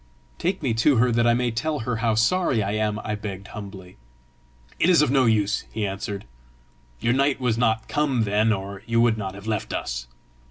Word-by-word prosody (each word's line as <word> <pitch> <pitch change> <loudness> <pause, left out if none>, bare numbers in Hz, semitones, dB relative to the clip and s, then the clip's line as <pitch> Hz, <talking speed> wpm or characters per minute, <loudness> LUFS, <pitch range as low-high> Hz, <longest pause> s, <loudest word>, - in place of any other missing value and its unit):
"Take 185 0 -1
me 125 -5 +1
to 145 +3 +4
her 125 +1 +3
that 120 0 +2
I 120 - +4
may 120 0 0
tell 150 +6 -2
her 115 0 -2
how 115 -2 +1
sorry 115 - +2
I 100 - -2
am," 105 0 0
I 105 - -3
begged 100 -2 -6
humbly. 95 -3 -9 0.8
"It 175 - +3
is 170 -4 +6
of 150 - +1
no 135 -2 +4
use," 105 -2 +1
he 110 -2 -2
answered. 100 0 -4 0.7
"Your 120 - +1
night 140 +1 +2
was 125 -4 +1
not 110 -2 +1
come 140 -6 +1
then, 105 +2 +2
or 100 -1 -4
you 115 0 +2
would 115 -2 +3
not 95 -2 -4
have 100 +1 -11
left 110 -3 -2
us. - - -4
110 Hz, 205 wpm, -24 LUFS, 105-125 Hz, 0.8 s, is